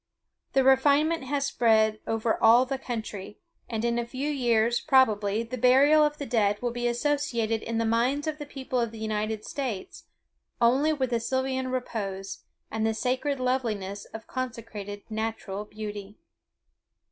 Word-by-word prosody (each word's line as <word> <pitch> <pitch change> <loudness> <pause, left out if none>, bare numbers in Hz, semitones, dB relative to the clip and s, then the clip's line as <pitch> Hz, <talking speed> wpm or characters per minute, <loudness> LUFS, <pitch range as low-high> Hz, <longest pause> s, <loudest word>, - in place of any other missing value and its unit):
The 270 - +4
refinement 285 +4 +4
has 280 +1 -1
spread 220 -4 +3
all 225 - 0
over 225 +2 +4
the 270 0 -3
country; 220 -6 -6 0.3
and 225 0 -2
in 235 0 +1
a 235 - -2
few 270 +5 -3
years, 240 -3 +2
probably, 220 -6 +3
the 235 +2 -6
burial 280 +5 +6
of 295 0 +1
the 285 - -5
dead 210 -4 +1
will 245 -1 -2
be 240 0 -2
associated 240 -3 0
in 230 0 -3
the 230 - +1
minds 245 +6 +1
of 310 -1 -3
the 295 - -6
people 260 -3 -3
of 235 -1 0
the 225 - -10
United 215 0 -2
States 250 -9 -5 0.5
only 265 +6 +4
with 265 -5 -1
sylvan 260 +1 -1
repose, 205 -7 -4 0.3
and 220 0 -2
the 220 0 +1
sacred 260 +4 -1
loveliness 220 -6 -2
of 220 - -10
consecrated 225 -5 -6
natural 220 -2 -4
beauty. 210 -1 -7
235 Hz, 155 wpm, -27 LUFS, 220-265 Hz, 0.5 s, burial